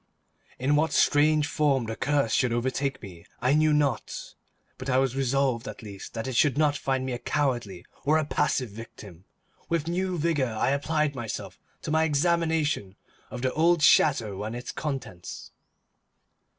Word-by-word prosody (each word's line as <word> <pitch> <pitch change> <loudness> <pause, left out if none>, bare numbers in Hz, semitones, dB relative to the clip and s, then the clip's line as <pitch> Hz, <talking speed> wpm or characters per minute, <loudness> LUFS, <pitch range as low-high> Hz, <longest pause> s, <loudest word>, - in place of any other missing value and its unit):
In 135 +3 +1
what 155 0 +1
strange 150 +1 +4
form 145 -4 +1
the 115 0 -4
curse 140 -3 0
should 125 -2 +2
overtake 130 +3 -1
me, 90 -4 -10 0.2
I 130 +2 +2
knew 155 +1 +4
not; 145 -6 -1 0.5
but 130 +1 -5
I 130 - +3
was 135 -1 +1
resolved 135 -2 0
at - - -8
least 100 0 -9
that 115 - -3
it 130 -2 -4
should 140 +1 +3
not 150 -1 +3
find 135 -2 -1
me 130 - -3
a 120 - -4
cowardly 120 -13 -2 0.2
or 155 +2 +3
a 155 - 0
passive 130 -5 0
victim. 100 -5 -11 0.4
With 165 -2 0
new 180 +1 -1
vigour 145 -8 0
I 125 - +2
applied 150 +1 0
myself 120 -5 -6 0.2
to - - -3
my 160 +1 +3
examination 160 - +1 0.3
of 125 0 -7
the 130 - 0
old 165 0 +3
chateau 110 -10 +4
and 110 +2 -4
its 120 - -6
contents. 135 - -6
135 Hz, 165 wpm, -27 LUFS, 120-150 Hz, 0.5 s, strange